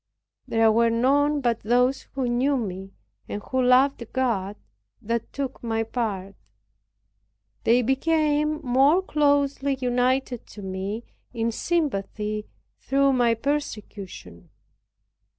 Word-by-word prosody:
There 225 -1 +4
were 230 +1 +3
none 285 +5 +2
but 235 -3 +1
those 250 +4 +1
who 265 -2 -1
knew 260 +4 +1
me, 195 -4 -5 0.3
and 205 - -3
who 260 0 -1
loved 255 +1 +4
God, 215 -7 0 0.4
that 230 +1 -3
took 275 -2 -4
my 225 -1 -1
part. 210 -5 -3 1.3
They 245 +2 +4
became 300 +3 +1
more 275 +8 +4
closely 285 -3 +1
united 250 0 0
to 205 - -11
me 190 +4 -4 0.3
in 230 0 0
sympathy 215 - -2 0.3
through 275 0 +2
my 240 -2 +3
persecution. 210 - -5
245 Hz, 110 wpm, -25 LUFS, 220-275 Hz, 1.3 s, There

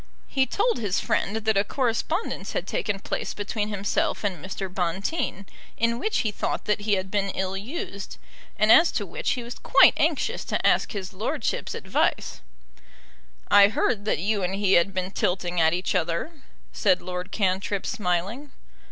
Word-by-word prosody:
He 265 -1 +1
told 460 +3 +1
his 200 -5 0
friend 200 - 0
that 220 -1 +1
a 200 - +4
correspondence 265 - -2
had - - -2
taken 205 -2 -2
place - - -4
between 210 +1 -2
himself 215 +11 -1
and 185 -7 -2
Mr. 190 0 -4
Bonteen, 190 - -2 0.3
in 230 +1 +1
which 435 - 0
he 215 - -1
thought - - -3
that 210 0 0
he 210 0 0
had 190 -1 -1
been 200 -1 0
ill 190 0 -2
used, 200 - -6 0.4
and 215 +1 +4
as 335 +1 +7
to - - -1
which - - -2
he 250 - -4
was 240 +1 -8
quite - - +6
anxious - - 0
to - - -2
ask - - +3
His 195 -2 -5
Lordship's 195 +4 -2
advice. - - -1 1.1
"I 200 0 +8
heard 210 0 0
that 215 - +1
you 205 +3 0
and 185 +1 -1
he 195 -1 +2
had 170 +3 +4
been 185 0 -3
tilting 180 -2 0
at 160 0 +5
each 180 +2 -1
other," 170 - -1 0.4
said 185 -3 +3
Lord 180 0 -5
Cantrip, 195 0 0
smiling. 210 +6 -2
200 Hz, 170 wpm, -25 LUFS, 185-225 Hz, 1.1 s, I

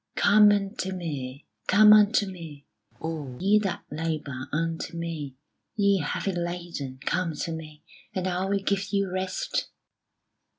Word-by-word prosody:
"Come 210 0 +6
unto 195 -1 -1
Me, 140 -6 -5 0.2
come 210 +2 +8
unto 210 0 +5
Me 165 -7 -9 0.3
All 150 -6 -5
ye 205 +3 +4
that 195 -3 -3
labour, 150 -4 -3
unto 165 +2 -2
Me 160 -5 -4 0.4
Ye 200 -2 +3
heavy 160 +5 -1
laden, 175 -6 -4
come 165 -4 0
to 165 +3 -3
Me 155 -2 -8 0.3
And 185 -1 -1
I 185 0 0
will 200 +1 +1
give 195 +1 -1
you 200 -2 +1
rest." 190 - -2
175 Hz, 135 wpm, -27 LUFS, 155-195 Hz, 0.4 s, come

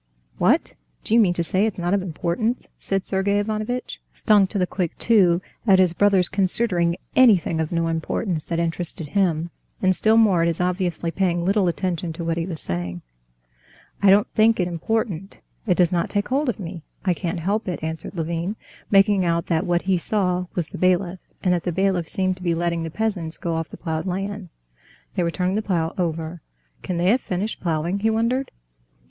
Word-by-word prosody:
"What! - - +2 0.3
do - - -2
you 235 - +6
mean 185 -6 +3
to 170 - +1
say 190 +5 +1
it's 215 - -4
not 175 +1 -1
of 200 - +2
importance?" 185 +7 -2
said 195 -1 -2
Sergey 200 +1 0
Ivanovitch, 215 +4 -3
stung 205 -3 +3
to 205 - -4
the 185 - +2
quick 180 -2 -3
too 185 -6 +3 0.2
at 195 -2 +7
his 185 -2 +4
brother's 195 -1 +3
considering 185 -3 +2 0.2
anything 205 -10 +4
of 160 -1 -2
no 165 -1 0
importance 165 +1 -2
that 170 - -2
interested 165 -2 -1
him, 170 -4 0 0.3
and 185 -1 +2
still 220 +4 +3
more 200 -7 +4
at 165 - +2
his 170 -1 -1
obviously 180 -2 -1
paying 175 -2 0
little 195 0 +2
attention 175 -1 -2
to 170 - -6
what 165 0 -1
he 170 +1 -2
was 165 -4 -5
saying. 85 0 -4 1.0
"I 200 - +5
don't 200 +2 +6
think 220 0 +3
it 180 - +1
important; 195 +1 -3 0.3
it - - +3
does 175 -2 +3
not 170 -2 0
take 205 -1 -1
hold 275 +2 +1
of 235 - -3
me, 175 -2 -6 0.2
I 185 - +3
can't 175 +1 -3
help 200 +6 -1
it," 175 -3 -4
answered 160 +3 -5
Levin, 170 +4 -2 0.3
making 195 -1 +4
out 170 -1 0
that 160 -2 0
what 175 0 +1
he 185 -2 +1
saw 180 -2 0
was 170 -3 -2
the - - -8
bailiff, 185 0 +1 0.2
and 180 - +3
that 175 - 0
the 175 - -2
bailiff 190 -2 0
seemed 185 +1 -1
to - - -15
be 170 -2 +1
letting 170 0 -1
the 165 - -3
peasants 180 -4 -2
go 170 - -3
off 165 -1 -3
the - - -10
ploughed 160 +1 -3
land. 195 +1 -4 0.6
They - - -1
were 170 - +1
turning 180 +2 -1
the 215 - 0
plough 170 -6 -1
over. 165 -1 -3 0.4
"Can 180 - -3
they 175 +3 +3
have 250 +2 +2
finished 195 +4 -3
ploughing?" 170 +3 -1
he 220 +2 +2
wondered. 230 +4 0
180 Hz, 200 wpm, -23 LUFS, 170-200 Hz, 1.0 s, at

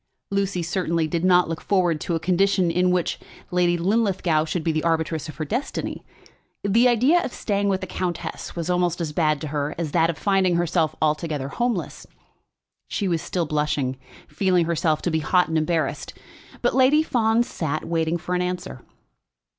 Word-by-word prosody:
Lucy 195 -3 0
certainly 170 -2 0
did 170 +2 -2
not 180 -1 +5
look 165 0 -4
forward 175 -5 +1
to 170 - -1
a - - -1
condition 185 +1 +2
in 180 +1 +2
which 180 -1 0 0.3
Lady 175 -1 +2
Linlithgow 185 -4 +1
should 160 +1 -3
be 165 - +1
the 155 0 -1
arbitress 160 -1 -1
of 155 - -8
her 155 - -4
destiny. 245 - -3 0.6
The 225 +5 +4
idea 255 +9 +4
of - - -4
staying 200 -3 -1
with 190 -1 0
the - - -3
countess 175 -2 -4
was 170 -1 -3
almost 180 -1 +1
as 165 -3 -2
bad 155 -2 +1
to 155 - -4
her 145 0 -2
as 165 -3 -3
that 165 0 +3
of 165 - -2
finding 190 -1 +2
herself 170 -2 +1
altogether 150 -3 -1
homeless. 235 +2 -2 0.8
She 200 - -2
was 170 -3 0
still 175 -2 -2
blushing, 150 -4 -1 0.3
feeling 185 -3 +1
herself 160 -2 0
to 175 - 0
be 160 - +1
hot 180 +3 +2
and 160 - 0
embarrassed. 160 0 -2 0.5
But - - +2
Lady 270 +4 +4
Fawn 230 -4 +2
sat, 155 -8 -3
waiting 165 0 0
for 175 +2 -5
an 180 - +1
answer. 180 - -4
175 Hz, 180 wpm, -23 LUFS, 160-190 Hz, 0.8 s, not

